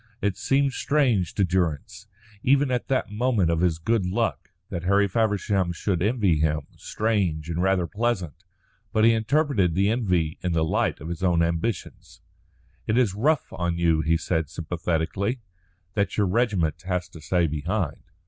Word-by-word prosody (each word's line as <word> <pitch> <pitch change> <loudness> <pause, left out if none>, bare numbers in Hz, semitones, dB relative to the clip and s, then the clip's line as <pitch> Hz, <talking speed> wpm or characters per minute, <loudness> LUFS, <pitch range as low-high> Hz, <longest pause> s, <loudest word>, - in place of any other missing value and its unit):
It 100 -4 0
seemed 135 +7 +1
strange 125 - +1
to 100 - +2
Durrance, 90 +1 -1 0.3
even 135 +2 +3
at 125 -1 -1
that 130 -5 0
moment 105 -6 +1
of 85 - 0
his 85 -2 +2
good 110 +5 0
luck, 90 0 -2 0.2
that 85 -3 -3
Harry 100 +2 +3
Feversham 100 -3 0
should 85 0 -2
envy 100 -6 +2
him 75 0 +1
strange 95 -8 -1
and 85 +1 -1
rather 95 -1 +2
pleasant. 105 - -1 0.6
But 110 - +2
he 115 - +6
interpreted 110 - +1
the 100 +3 +2
envy 90 -9 0
in 90 -2 -1
the 80 -1 +2
light 80 - 0
of 80 - -6
his 85 0 -5
own 85 -3 +3
ambitions. 85 +5 -3 0.7
"It 110 - +1
is 120 -7 +3
rough 140 +8 0
on 85 -1 -2
you," 85 -2 +2
he 80 +2 +2
said 80 -3 -1
sympathetically, 90 - -2 0.5
"that 100 -2 -1
your 105 - +3
regiment 95 - 0
has 90 -1 -2
to 80 - -12
stay 85 +2 +1
behind." 80 +3 -2
95 Hz, 165 wpm, -25 LUFS, 85-110 Hz, 0.7 s, he